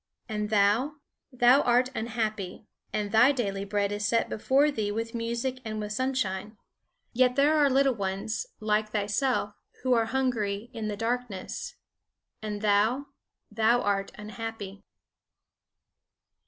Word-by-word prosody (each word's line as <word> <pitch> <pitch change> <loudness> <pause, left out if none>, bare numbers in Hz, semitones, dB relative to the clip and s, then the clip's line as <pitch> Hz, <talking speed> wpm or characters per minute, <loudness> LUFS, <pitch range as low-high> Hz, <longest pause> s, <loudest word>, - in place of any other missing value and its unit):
"And 210 -2 -2
thou? 215 +7 +3 0.4
Thou 250 +2 +5
art 250 +1 +3
unhappy. 220 -5 -3 0.3
And 210 -1 -2
thy 240 +5 +6
daily 200 -7 -2
bread 200 0 0
is 205 0 -3
set 230 +2 +1
before 275 +7 +2
thee 215 -6 -2
with 230 +2 -3
music 235 +2 -2
and 215 -1 -4
with 210 0 -4
sunshine. 215 -4 -2 0.6
"Yet 250 0 +3
there 290 +3 +4
are 290 -2 +4
little 270 0 +3
ones, 200 - -3
like 215 0 +1
thyself, 210 +1 0 0.3
who 255 -1 +3
are 230 -2 +3
hungry 230 -3 -1
in 225 -2 -4
the 210 -1 -3
darkness. 230 -3 -3 0.7
"And 210 -1 -5
thou? 220 +7 +2 0.4
Thou 225 +3 +3
art 195 -1 0
unhappy." 210 -1 -7
220 Hz, 130 wpm, -28 LUFS, 205-250 Hz, 0.7 s, thy